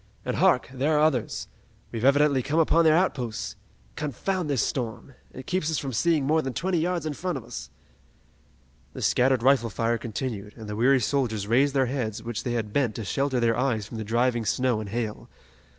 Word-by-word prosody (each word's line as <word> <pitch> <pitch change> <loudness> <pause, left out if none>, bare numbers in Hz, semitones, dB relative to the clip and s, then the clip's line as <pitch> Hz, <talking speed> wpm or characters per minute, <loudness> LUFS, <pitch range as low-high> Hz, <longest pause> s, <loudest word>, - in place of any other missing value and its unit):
And - - -2
hark, - - +3
there 145 +4 +1
are - - +3
others! 145 -7 0 0.4
We've 115 0 -4
evidently 140 0 +4
come 145 +5 -2
upon 165 +1 +4
their 155 -1 +6
outposts! 125 - -1 0.4
Confound 170 +4 -2
this 140 -4 +1
storm! 120 +1 -4 0.2
It 130 - -9
keeps 180 -4 -1
us 160 - 0
from 135 -2 -4
seeing 155 +3 +2
more 155 +3 +3
than 135 -3 -4
twenty 180 +6 0
yards 170 -1 -1
in 155 - -2
front 180 +1 -3
of 130 - -8
us!" - - -7 1.2
The - - -6
scattered 130 -1 +3
rifle 130 -3 +4
fire 115 +2 0
continued, 110 -3 -5
and 110 -2 -9
the 105 - -4
weary 130 +4 +4
soldiers 110 -4 0
raised 135 +6 +2
their 135 -1 +3
heads 120 -4 -3
which 120 -1 -4
they 120 - -2
had 110 -3 -3
bent 125 -7 +1
to 110 - -5
shelter 135 +6 0
their 115 -1 +2
eyes 120 -4 0
from 115 +1 -7
the - - -3
driving 120 +2 +1
snow 125 +1 +1
and 105 -2 -6
hail. 110 0 -4
130 Hz, 200 wpm, -26 LUFS, 115-145 Hz, 1.2 s, their